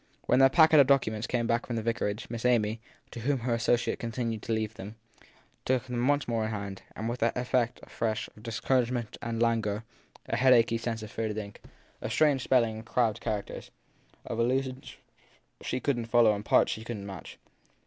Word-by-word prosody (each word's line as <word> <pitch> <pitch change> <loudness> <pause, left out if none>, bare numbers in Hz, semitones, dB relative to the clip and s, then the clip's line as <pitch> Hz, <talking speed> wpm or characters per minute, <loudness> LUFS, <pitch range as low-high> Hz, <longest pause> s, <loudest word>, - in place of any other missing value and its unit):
When - - +3
their 135 0 +7
packet 160 0 +6
of 140 - +6
documents 115 -5 +2
came 120 -2 0
back 115 +1 0
from 120 - -3
the 115 - -2
vicarage 115 -1 -2
Miss 115 -1 -6
Amy, 115 -3 +2 0.3
to 120 - -7
whom 130 +2 0
her 120 0 0
associate 115 +1 +1
continued 115 -2 -3
to - - -5
leave 110 -1 -1
them, 105 +1 -9 0.7
took 130 -2 +1
them 125 -1 -2
once 145 0 +2
more 115 -2 0
in - - -2
hand; 100 -2 -5
but 110 - -5
with 120 +1 -4
an 115 0 +2
effect, 125 -1 0
afresh, 110 -1 -2
of 105 - -18
discouragement 120 0 -1
and 115 -1 -3
languor 115 -2 +1 0.4
a 115 - -1
headachy 120 -2 +4
sense 115 -1 -3
of 110 - -9
faded 110 -1 -3
ink, 100 -1 -7 0.4
of - - -4
strange 145 -4 +3
spelling 115 -4 +2
and 110 - -9
crabbed 115 -4 +1
characters, 105 -2 -4 0.6
of 115 - -4
allu 130 +3 +2
sions 130 0 -9 0.6
she 125 - -2
couldn 120 -3 -1
t - - -16
follow 115 -2 +5
and 105 0 -5
parts - - +4
she 110 - -5
couldn 115 -3 -6
t - - -8
match. 95 -3 -9
115 Hz, 200 wpm, -29 LUFS, 110-125 Hz, 0.7 s, their